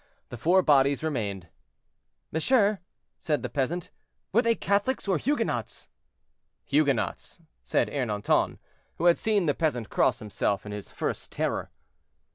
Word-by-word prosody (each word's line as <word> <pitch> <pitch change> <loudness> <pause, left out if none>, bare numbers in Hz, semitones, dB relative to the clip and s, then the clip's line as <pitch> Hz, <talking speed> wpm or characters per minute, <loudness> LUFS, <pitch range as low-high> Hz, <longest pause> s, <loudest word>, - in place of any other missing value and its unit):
The 120 - -7
four 180 - +4
bodies 140 -1 +4
remained. 105 - -2 0.8
"Monsieur," 205 - +2 0.4
said 150 -6 -1
the - - -3
peasant, 155 +6 -2 0.4
"were 230 - +5
they 230 -1 +2
Catholics 205 +5 0
or 185 -5 +2
Huguenots?" 290 - -2 0.8
"Huguenots," 140 +1 0 0.2
said - - +1
Ernanton, 110 -7 0 0.4
who 170 - -3
had 175 -1 +5
seen 210 -4 +1
the 145 - +2
peasant 130 -10 -1
cross - - +2
himself 105 -1 -2
in 105 - -6
his 105 -1 -7
first - - -4
terror. - - -2
150 Hz, 130 wpm, -27 LUFS, 120-195 Hz, 0.8 s, were